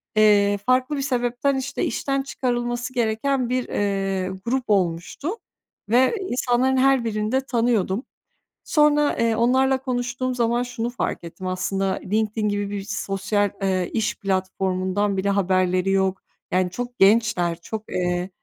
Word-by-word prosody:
eee, 205 -1 +5
farklı 255 +3 +2
bir - - -1
sebepten, 250 +1 0
işte, 275 +1 -3
işten 275 +3 -1
çıkarılması 240 -1 -2
gereken 245 +2 0
bir, 255 0 -1
eee, 195 -2 -1 0.2
grup 255 +2 0
olmuştu 185 - 0 0.6
ve 255 - +4
insanların 255 +1 +1
her 265 -2 +3
birini 215 0 -1
de 265 - +2
tanıyordum. 230 -3 +1 0.6
Sonra, 295 -1 +3
eee, 230 -1 +2
onlarla 260 +3 +3
konuştuğum 255 0 -2
zaman 240 0 +1
şunu 240 -1 -3
fark 245 - -3
ettim 170 +2 -7
aslında, 190 +1 -1
LinkedIn 215 +1 0
gibi 205 0 -2
bir 205 -1 -3
s 200 - -4
sosyal, 200 +1 0
eee, 185 -2 0
iş 220 -2 0
platformundan 190 +1 -1
bile 195 +1 0
haberleri 185 -1 +1
yok. 190 -1 +1 0.3
Yani, 185 0 +2
çok 245 +3 -6
gençler, 195 -5 +3
çok, 220 +4 -5
eee, 180 0 -1
220 Hz, 140 wpm, -23 LUFS, 195-250 Hz, 0.6 s, eee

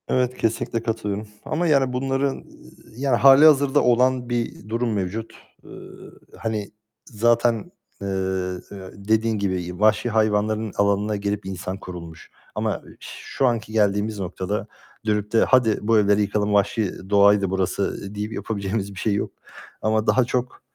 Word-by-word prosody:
Evet, 125 0 0
kesinlikle 115 0 -1
katılıyorum 110 -2 -3 0.2
ama 170 +2 -1
yani 135 -4 +3
bunların 135 +1 -1 0.5
yani 135 -1 +1
hâlihazırda 140 +1 +6
olan 125 0 +2
bir 120 -3 -3
durum 115 0 -1
mevcut. 105 +3 -3 0.3
Eee, - - -15 0.7
hani 110 -2 -3 0.3
zaten, 115 0 +1 0.3
eee, 100 - -4 0.9
dediğin 110 +2 0
gibi 90 -3 -3
vahşi 110 +2 +3
hayvanların 110 0 +1
alanına 100 +1 +1
girip 100 0 -3
insan 95 0 -5
kurulmuş 85 -4 -10 0.2
ama - - -1 0.2
şu 135 - -4
anki 115 -2 -1
geldiğimiz 105 0 +1
noktada 95 +2 -3 0.4
dönüp 105 -1 0
de 115 - +4
"Hadi, 120 -5 +3
bu 110 +1 +3
evleri 105 0 +3
yıkalım, 105 0 0
vahşi 100 0 +1 0.2
doğaydı 100 -1 +5
burası." 95 +1 -2
deyip 105 +1 -4
yapabileceğimiz 100 -2 -3
bir 95 - -8
şey 110 - 0
yok 100 - -2 0.5
ama 110 +1 +1
daha, 130 - +4
eee, 120 - 0
çok 125 0 -3
110 Hz, 135 wpm, -23 LUFS, 100-120 Hz, 0.9 s, hâlihazırda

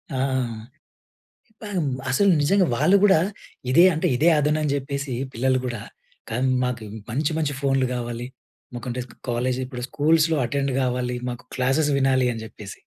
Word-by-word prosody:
ఆ! - - -1 1.5
పామ్ 190 -8 -2 0.2
అసలు 200 +10 +4
నిజంగా 190 +5 +3
వాళ్ళు 185 +11 +4
కూడా 195 -5 +6 0.5
ఇదే 170 +7 +7
అంటే, 155 - 0
ఇదే 155 +7 +3
అదును 150 +1 +2
అని 150 - 0
చెప్పేసి, 140 -1 -4 0.2
పిల్లలు 130 +2 +1
కూడా 120 -3 -4 0.5
కం 125 +4 0 0.2
మాకు 125 -3 -3 0.3
మంచి, 145 +6 0
మంచి 145 -3 -1
ఫోన్‌లు 135 -2 +2
కావాలి. 120 0 -4 0.5
మాకంటే 125 +1 -4
స్ - - -18
క - - -18 0.2
కాలేజీ 125 +2 -1
ఇప్పుడు 125 -1 -7
స్కూల్స్‌లో 160 +2 +2
అటెండ్ 140 +1 -1
కావాలి. 125 -1 -1
మాకు 120 0 -8
క్లాసెస్ 135 +4 +2
వినాలి 130 -1 +3
అని 115 -1 -6
చెప్పేసి. 105 -2 -10
130 Hz, 155 wpm, -23 LUFS, 125-150 Hz, 1.5 s, ఇదే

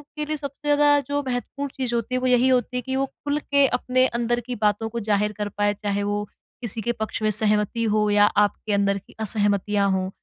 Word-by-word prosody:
के 300 -1 -3
लिए 305 0 -3
सबसे 280 +1 -8
ज़्यादा 290 0 +4
जो 285 0 -1
महत्वपूर्ण 260 +3 -3
चीज़ 250 -3 -2
होती 235 +2 -2
है - - +1
वो 255 - 0
यही 250 0 +4
होती 250 -1 +1
है 250 - -1
कि 265 +1 -4
वो 270 +1 +1
खुल 290 +2 -4
के 280 -1 +2
अपने 255 0 +2
अंदर 240 0 -1
की 250 0 -4
बातों 210 +1 +1
को 235 +1 -4
ज़ाहिर 210 -1 0
कर 205 -1 -3
पाए 205 0 +2
चाहे 205 0 -2
वो 205 0 -1 0.4
किसी 230 -1 -2
के 240 - -1
पक्ष 220 -1 -4
में 215 - +2
सहमति 210 +2 +2
हो 210 0 +2
या 205 0 +5
आपके 210 0 +1
अंदर 200 0 +2
की 195 - -14
असहमतियाँ 205 -1 +1
हों। 185 0 -1
225 Hz, 230 wpm, -23 LUFS, 205-255 Hz, 0.4 s, या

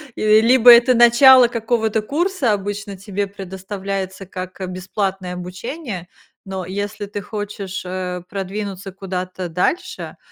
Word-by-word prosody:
И 215 0 +4
либо 245 +1 +6
это 240 +2 +6
начало 245 +2 +7
какого-то 225 -2 0
курса, 300 - 0
обычно 205 0 -3
тебе 200 +1 -3
предоставляется 195 0 -6
как 185 0 -8
бесплатное 185 0 -3
обучение, 185 - -6 0.4
но 190 -1 -5
если 205 +3 -4
ты 205 0 -6
хочешь, 200 -2 -5
э, 180 -1 -4
продвинуться 195 0 -5
куда-то 185 -1 -5
дальше, 340 - -2
200 Hz, 115 wpm, -20 LUFS, 185-225 Hz, 0.4 s, начало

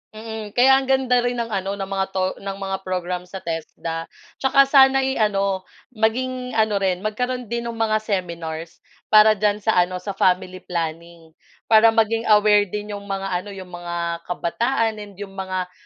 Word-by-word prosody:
Mm, 220 -1 -7
kaya 255 +4 +5
ang 270 - +2
ganda 250 -2 +3
rin 245 0 -1
ng 235 - -1
ano 195 -3 -2
ng 195 - -3
mga 195 0 -1
'to 190 -1 -1 0.2
ng 195 0 -4
mga 195 -1 -3
program 180 -1 -3
sa 180 +2 -8
TESDA, 165 0 -5 0.2
'tsaka 275 +1 +4
sana'y 270 -1 +5
ano, 195 -3 0 0.3
maging 250 +3 -1
ano 220 -2 +1
rin 185 -2 +1
magkaroon 245 +4 -3
din 235 +2 -3
ng 230 - -9
mga 220 -1 +2
seminars. 170 -5 -4 0.2
Para 215 0 +7
diyan 210 -1 +1
sa 220 - +3
ano, 180 +1 0
sa 200 - -3
family 185 -1 +1
planning. 165 -1 -5 0.4
Para 225 0 +6
maging 225 +1 +1
aware 210 -1 +5
din 210 +2 -5
'yong 200 0 -7
mga 195 -1 -3
ano, 200 +2 -9
'yong 185 -2 -10
mga 175 0 -6 0.3
kabataan 225 +5 -1
and 205 -1 -10
'yong 200 0 -8
mga 185 -1 -4
205 Hz, 175 wpm, -22 LUFS, 185-225 Hz, 0.4 s, Para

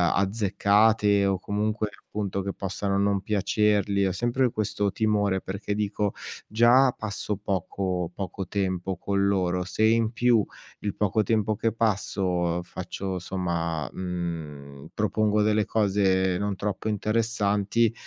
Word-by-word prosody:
azzeccate 100 +1 +3
o, 95 -1 +1
comunque, 105 +2 -1 0.2
appunto, 100 -2 -3
che 100 0 -4
possano 100 0 -2
non 100 -1 +1
piacerli. 100 0 +1
Ho 95 - +1
sempre 120 +5 +1
questo 105 -2 -1
timore 105 -3 +1
perché, 100 +2 -4
dico: 105 -1 -1 0.3
"Già 120 +4 +5
passo 105 0 -3
poco 95 -2 -2
poco 95 0 -5
tempo 95 -1 -2
con 100 +2 0
loro. 90 -2 +1
Se 90 +4 -2
in 115 0 +3
più 120 -3 +3 0.3
il 105 -2 -3
poco 105 +1 +1
tempo 110 0 +1
che 115 +2 0
passo, 95 -5 0
faccio 95 +2 -5
somma, 85 -4 -2
mhmm, 80 -6 -6
propongo 105 0 +1
delle 105 0 +2
cose 95 -3 +2
non 100 +1 -2
troppo 100 +2 -3
interessanti, 110 0 +1
100 Hz, 125 wpm, -26 LUFS, 95-105 Hz, 0.3 s, Già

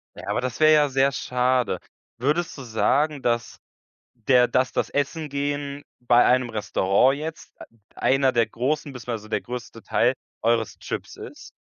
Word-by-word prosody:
Ja, - - -10
aber - - 0
das 125 +2 -4
wäre 155 0 +6
ja 150 -2 +4
sehr 135 +1 +2
schade. 125 -2 0 0.4
Würdest 150 +6 -1
du 135 - -7
sagen, 140 +6 +1
dass 120 -2 -1 0.6
der 125 +1 +3
dass 130 0 +1
das - - -1
Essen 150 +2 -2
gehen 145 0 -3 0.2
bei 120 0 +4
einem 125 -1 +3
Restaurant 110 +5 +2
jetzt, 160 +1 -7
äh, - - -8 0.3
einer 135 0 +2
der 115 -3 +2
großen 135 +6 -2
beziehungsweise 115 -3 -6
der - - -1
größte 120 -2 -8
Teil, 125 +2 +2 0.3
eures 115 -1 0
Trips - - -6
ist? - - -11
130 Hz, 160 wpm, -24 LUFS, 120-145 Hz, 0.6 s, wäre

